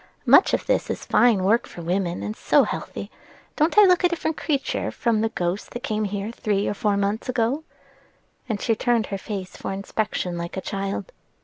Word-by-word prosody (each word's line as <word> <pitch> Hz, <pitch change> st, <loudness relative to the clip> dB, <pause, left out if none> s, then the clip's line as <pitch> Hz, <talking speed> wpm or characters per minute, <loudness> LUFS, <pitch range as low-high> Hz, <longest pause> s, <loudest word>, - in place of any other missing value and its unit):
Much -, -, +6 dB
of -, -, 0 dB
this -, -, +1 dB
is -, -, -4 dB
fine 230 Hz, -6 st, +4 dB
work 220 Hz, +5 st, +2 dB
for 170 Hz, -, -9 dB
women, 175 Hz, 0 st, -1 dB
and 210 Hz, -, -4 dB
so -, -, +4 dB
healthy. -, -, -5 dB, 0.4 s
Don't 320 Hz, +6 st, +1 dB
I 420 Hz, -, +10 dB
look 365 Hz, -2 st, +5 dB
a 355 Hz, -, +5 dB
different 325 Hz, -2 st, -2 dB
creature 285 Hz, -4 st, -1 dB
from 230 Hz, -3 st, 0 dB
the 225 Hz, -, +1 dB
ghost 180 Hz, 0 st, -2 dB
that 240 Hz, -, -7 dB
came 215 Hz, 0 st, -1 dB
here 205 Hz, +2 st, -3 dB
three 205 Hz, -3 st, -1 dB
or -, -, 0 dB
four 205 Hz, -1 st, 0 dB
mouths 200 Hz, +5 st, -1 dB
ago?" 255 Hz, +5 st, 0 dB, 0.9 s
and 215 Hz, -3 st, -1 dB
she 230 Hz, -, +1 dB
turned 235 Hz, 0 st, +1 dB
her 195 Hz, -, -2 dB
face 190 Hz, -2 st, -6 dB
for -, -, -5 dB
inspection 195 Hz, -2 st, -2 dB
like 170 Hz, +2 st, -5 dB
a -, -, -2 dB
child. 195 Hz, -, -4 dB
215 Hz, 200 wpm, -24 LUFS, 195-240 Hz, 0.9 s, I